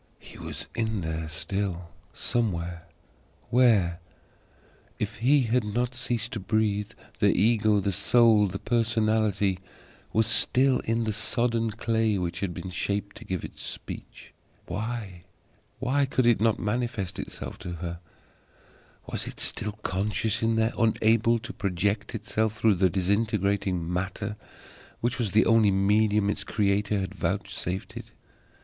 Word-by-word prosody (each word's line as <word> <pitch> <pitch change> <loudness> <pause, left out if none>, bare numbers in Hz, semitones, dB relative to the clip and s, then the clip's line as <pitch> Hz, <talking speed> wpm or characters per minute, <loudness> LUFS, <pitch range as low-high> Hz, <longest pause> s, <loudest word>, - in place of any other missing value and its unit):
HE - - -14
was - - -6
in 110 -3 -1
there 80 -1 -3
still, 90 +1 -3 0.2
somewhere. 85 -7 -2 0.6
Where? 105 -9 +4 1.0
If - - -3
he 135 +6 +4
had 120 +1 +1
not 120 +4 -1
ceased 120 -2 -2
to 110 - -3
breathe, 105 0 0 0.3
the - - +5
Ego, 110 0 +4
the 100 0 0
Soul, 105 +2 +5
the 95 +1 -4
Personality 110 -4 +1 0.5
was 110 0 +3
still 130 +4 +3
in 115 +1 +1
the 110 -1 -1
sodden 115 +1 0
clay 110 -1 0
which 90 -2 -3
had 90 -4 -3
shaped 100 +2 -2
to - - -10
give 95 -3 -3
it - - -11
speech. - - -8 0.3
Why 105 -2 -5 0.9
could 130 -2 +2
it 120 -4 +4
not 110 -1 +3
manifest 105 -3 -2
itself - - -7
to 90 - -6
her? 85 0 -5 1.1
Was - - -4
it - - -8
still 105 0 -1
conscious 105 +3 -1
in 115 0 +2
there, 110 +1 +2
unable 115 +1 +3
to 110 - -7
project 100 +3 -1
itself 110 0 -1
through 110 -1 +4
the 95 - +5
disintegrating 100 -2 0
matter 100 +3 -3 0.6
which 120 +2 -1
was 110 -5 -1
the 110 - +5
only 115 -2 +5
medium 105 +1 +3
its 100 - -3
Creator 100 0 +1
had 95 - -4
vouchsafed 95 -2 -3
it? - - -9
105 Hz, 135 wpm, -27 LUFS, 95-115 Hz, 1.1 s, the